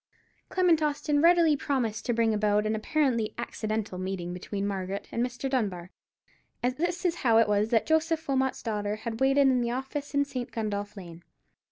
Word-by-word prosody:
Clement 355 Hz, -4 st, +3 dB
Austin 295 Hz, -1 st, +1 dB
readily 335 Hz, -2 st, +5 dB
promised 235 Hz, -6 st, -2 dB
to 240 Hz, -, +2 dB
bring 225 Hz, -1 st, +2 dB
about 210 Hz, 0 st, +2 dB
an 215 Hz, -, 0 dB
apparently 235 Hz, -1 st, 0 dB
accidental 215 Hz, -4 st, -3 dB
meeting 185 Hz, -2 st, -4 dB
between 195 Hz, +2 st, -4 dB
Margaret 195 Hz, -1 st, -3 dB
and 235 Hz, -, 0 dB
Mr. 245 Hz, +1 st, -3 dB
Dunbar, 195 Hz, -10 st, -2 dB, 0.7 s
and 250 Hz, +1 st, +1 dB
this 350 Hz, +4 st, -2 dB
is 345 Hz, -1 st, +1 dB
how 230 Hz, -3 st, +3 dB
it 225 Hz, -1 st, +5 dB
was 210 Hz, +1 st, +1 dB
that 225 Hz, -2 st, +2 dB
Joseph 320 Hz, 0 st, +1 dB
Wilmot's 265 Hz, -1 st, 0 dB
daughter 210 Hz, -2 st, -2 dB
had 225 Hz, +1 st, -5 dB
waited 270 Hz, +1 st, +4 dB
in 260 Hz, -2 st, +4 dB
the 235 Hz, -, -1 dB
office 270 Hz, +4 st, -4 dB
in 285 Hz, 0 st, +3 dB
St. 255 Hz, -3 st, -5 dB
Gundolph 205 Hz, -2 st, -3 dB
Lane. 170 Hz, -3 st, -10 dB
235 Hz, 180 wpm, -28 LUFS, 210-285 Hz, 0.7 s, readily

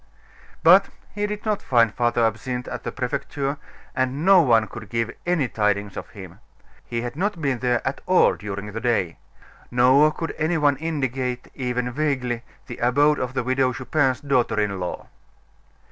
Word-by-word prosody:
But 185 Hz, +4 st, +7 dB, 0.2 s
he 205 Hz, 0 st, -1 dB
did 210 Hz, +1 st, -6 dB
not 215 Hz, -2 st, 0 dB
find 115 Hz, -4 st, +3 dB
Father 120 Hz, -1 st, +1 dB
Absinthe 125 Hz, +3 st, -3 dB
at -, -, -5 dB
the -, -, -4 dB
Prefecture, 140 Hz, +2 st, -3 dB, 0.4 s
and 130 Hz, +4 st, -1 dB
no 195 Hz, -2 st, +7 dB
one 115 Hz, -7 st, +4 dB
could 110 Hz, 0 st, -10 dB
give 115 Hz, -1 st, -1 dB, 0.2 s
any 170 Hz, -7 st, +2 dB
tidings 105 Hz, -3 st, -1 dB
of 90 Hz, -, -7 dB
him. 95 Hz, -3 st, -11 dB, 0.4 s
He 115 Hz, -1 st, -4 dB
had 120 Hz, +1 st, -5 dB
not 195 Hz, +2 st, -1 dB
been 135 Hz, -5 st, -1 dB
there 125 Hz, -1 st, 0 dB
at 130 Hz, -, -3 dB
all 185 Hz, -, +5 dB
during 100 Hz, 0 st, -6 dB
the 115 Hz, +2 st, -5 dB
day. 115 Hz, -9 st, 0 dB, 0.5 s
Nor 130 Hz, +5 st, +5 dB
could 165 Hz, +1 st, -5 dB
any 160 Hz, +2 st, +1 dB
one 145 Hz, -3 st, +3 dB
indicate, 130 Hz, -5 st, -3 dB
even 125 Hz, -1 st, -2 dB
vaguely, 130 Hz, -4 st, -1 dB, 0.2 s
the 125 Hz, -3 st, -8 dB
abode 145 Hz, +5 st, +3 dB
of 130 Hz, +1 st, -3 dB
the -, -, 0 dB
Widow 130 Hz, +1 st, +1 dB
Chupin's 130 Hz, 0 st, 0 dB
daughter 125 Hz, -6 st, +1 dB
in 100 Hz, -2 st, -1 dB
law. 90 Hz, -1 st, -5 dB
125 Hz, 170 wpm, -23 LUFS, 115-145 Hz, 0.5 s, But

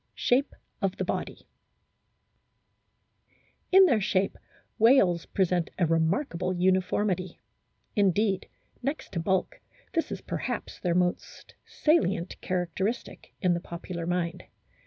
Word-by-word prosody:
SHAPE 260 Hz, +4 st, +1 dB, 0.3 s
OF 195 Hz, -2 st, 0 dB
THE -, -, -1 dB
BODY -, -, -4 dB, 2.2 s
In 385 Hz, +1 st, +8 dB
their 240 Hz, -, +3 dB
shape 190 Hz, 0 st, +1 dB, 0.4 s
whales 215 Hz, -8 st, +5 dB
present 180 Hz, -3 st, +1 dB
a 180 Hz, -, +3 dB
remarkable 170 Hz, -, 0 dB
uni 185 Hz, +1 st, +3 dB
formity; 185 Hz, -2 st, -1 dB, 0.6 s
indeed, 200 Hz, -1 st, +2 dB, 0.3 s
next 280 Hz, +5 st, -3 dB
to 170 Hz, -, -2 dB
bulk, 190 Hz, +3 st, 0 dB, 0.3 s
this 330 Hz, -, 0 dB
is -, -, -4 dB
perhaps -, -, -4 dB
their 175 Hz, -2 st, 0 dB
most 180 Hz, 0 st, -2 dB
salient 200 Hz, -, +1 dB
characteristic 185 Hz, +5 st, -3 dB
in 180 Hz, -3 st, +3 dB
the 170 Hz, -, -1 dB
popular 170 Hz, 0 st, -6 dB
mind. 175 Hz, -1 st, -2 dB
185 Hz, 115 wpm, -28 LUFS, 175-215 Hz, 2.2 s, In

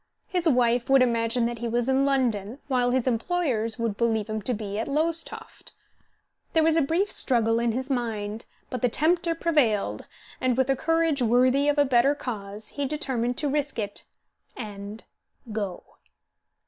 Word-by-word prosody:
His 355 Hz, -3 st, +1 dB
wife 245 Hz, -1 st, +2 dB
would 270 Hz, -1 st, +6 dB
imagine 230 Hz, 0 st, +1 dB
that 235 Hz, -1 st, -3 dB
he 235 Hz, -, -3 dB
was 240 Hz, +1 st, 0 dB
in 265 Hz, +1 st, +2 dB
London, 240 Hz, -5 st, 0 dB
while 250 Hz, -3 st, +1 dB
his 255 Hz, -1 st, +1 dB
employers 240 Hz, -3 st, 0 dB
would 230 Hz, -3 st, -2 dB
believe 225 Hz, -3 st, +1 dB
him 215 Hz, 0 st, -3 dB
to 245 Hz, +5 st, +1 dB
be 205 Hz, -1 st, -4 dB
at 225 Hz, -, -2 dB
Lowestoft. 325 Hz, +3 st, -2 dB, 0.8 s
There 320 Hz, -, +4 dB
was 320 Hz, 0 st, +4 dB
a 330 Hz, -, +4 dB
brief 340 Hz, +8 st, 0 dB
struggle 230 Hz, -3 st, +2 dB
in 235 Hz, 0 st, +1 dB
his 260 Hz, +3 st, -3 dB
mind, 225 Hz, -3 st, -3 dB, 0.3 s
but 250 Hz, -, -3 dB
the 245 Hz, -, +3 dB
tempter 335 Hz, +6 st, +1 dB
prevailed, 230 Hz, -, +1 dB, 0.4 s
and, 255 Hz, -1 st, +1 dB
with 260 Hz, +1 st, +2 dB
a -, -, +2 dB
courage 325 Hz, -1 st, +1 dB
worthy 255 Hz, +4 st, +3 dB
of 290 Hz, -, +1 dB
a 290 Hz, -, +5 dB
better 260 Hz, +2 st, +3 dB
cause, 210 Hz, -5 st, -6 dB
he 285 Hz, -1 st, -3 dB
determined 260 Hz, -5 st, -2 dB
to 300 Hz, -, 0 dB
risk 285 Hz, -1 st, -1 dB
it 205 Hz, -2 st, -4 dB, 0.5 s
and 205 Hz, -1 st, -7 dB, 0.5 s
go. 205 Hz, -4 st, -4 dB
245 Hz, 170 wpm, -26 LUFS, 225-285 Hz, 0.8 s, would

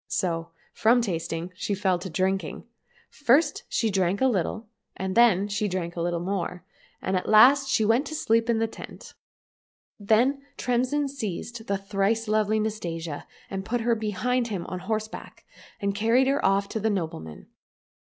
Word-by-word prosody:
So 170 Hz, -3 st, -1 dB, 0.2 s
from 235 Hz, +3 st, +4 dB
tasting 170 Hz, -3 st, -3 dB
she 200 Hz, +2 st, -2 dB
fell 190 Hz, -3 st, +1 dB
to 185 Hz, -, -6 dB
drinking. 190 Hz, +3 st, -1 dB, 0.5 s
First 290 Hz, +3 st, +2 dB
she 225 Hz, -2 st, 0 dB
drank 190 Hz, 0 st, +1 dB
a 265 Hz, -, +3 dB
little, 220 Hz, -1 st, 0 dB, 0.3 s
and 190 Hz, 0 st, -2 dB
then 215 Hz, -4 st, +5 dB
she 205 Hz, +1 st, -1 dB
drank 180 Hz, -3 st, -3 dB
a 170 Hz, -, -3 dB
little 170 Hz, 0 st, -1 dB
more, 180 Hz, -1 st, -3 dB, 0.4 s
and 190 Hz, -, 0 dB
at 180 Hz, -, -1 dB
last 270 Hz, +6 st, +7 dB
she 220 Hz, -5 st, +2 dB
went 240 Hz, +7 st, +2 dB
asleep 230 Hz, -7 st, +1 dB
in 230 Hz, -, +3 dB
the 225 Hz, -, +2 dB
tent. 225 Hz, -, -10 dB, 0.9 s
Then 235 Hz, +7 st, +2 dB, 0.2 s
Tremsin 255 Hz, +4 st, 0 dB
seized 235 Hz, -2 st, -5 dB
the 200 Hz, -, 0 dB
thrice 195 Hz, +3 st, 0 dB
lovely 215 Hz, 0 st, +2 dB
Nastasia 170 Hz, -8 st, -4 dB, 0.2 s
and 190 Hz, 0 st, -4 dB
put 240 Hz, +4 st, -2 dB
her 235 Hz, +1 st, +2 dB
behind 230 Hz, +3 st, -1 dB
him 195 Hz, -6 st, -4 dB
on 185 Hz, -, -5 dB
horse 215 Hz, +3 st, -2 dB
back, -, -, -11 dB, 0.3 s
and 200 Hz, 0 st, -1 dB
carried 230 Hz, +6 st, +3 dB
her 275 Hz, +2 st, +1 dB
off 195 Hz, +1 st, +2 dB
to 220 Hz, -, -3 dB
the 220 Hz, +1 st, +1 dB
nobleman. 160 Hz, -, -4 dB
210 Hz, 165 wpm, -26 LUFS, 185-230 Hz, 0.9 s, last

